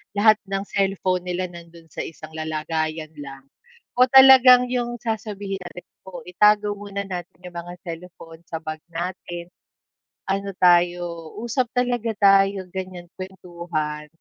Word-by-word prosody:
lahat 215 +1 +5
ng 195 0 -2
cellphone 190 -2 0
nila 180 +1 -2
nandun 170 -1 -13
sa - - -9
isang 155 -1 -10
lalagayan 155 0 -3
lang 135 -1 -9 0.6
o 255 - +7
talagang 260 -1 +8
yung 240 -1 -2
sasabihin 205 -3 -4
natin, 175 0 -10 0.2
oh, 175 -3 -9
itago 210 +3 +3
muna 200 -1 -6
natin 180 -3 -7
yung 180 - -9
mga 175 +1 -6
cellphone 165 -1 -9
sa 160 - -4
bag 155 0 -6
natin. 175 0 -5 0.8
Ano 195 +1 -1
tayo, 175 -2 +2
usap 240 0 -1
talaga 245 -2 0
tayo, 195 -1 +4
ganyan 185 -2 -6
kwentuhan. 170 -5 -5
180 Hz, 130 wpm, -23 LUFS, 170-205 Hz, 0.8 s, talagang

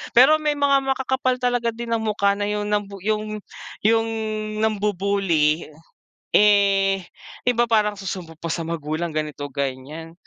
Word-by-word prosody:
Pero 270 +6 +7
may 300 -1 +1
mga 280 -1 +3
makakapal 265 -1 0
talaga 245 -1 +1
din 235 0 -6
ang - - -5
mukha 200 -2 +2
na 205 - -1
yung, 210 0 -1
nambu 205 -1 -1
yung 215 0 -1 0.5
yung 225 0 +4 0.6
nambubully. 195 -7 +1 0.7
Eh, 200 -2 +4 0.5
iba 240 -1 +3
parang 215 -3 +1
susumbong 185 -4 -6
pa 165 0 -4
sa 170 - -2
magulang 160 0 -3
ganito 150 -2 -3
ganyan. 140 +4 -5
205 Hz, 135 wpm, -22 LUFS, 165-225 Hz, 0.7 s, Pero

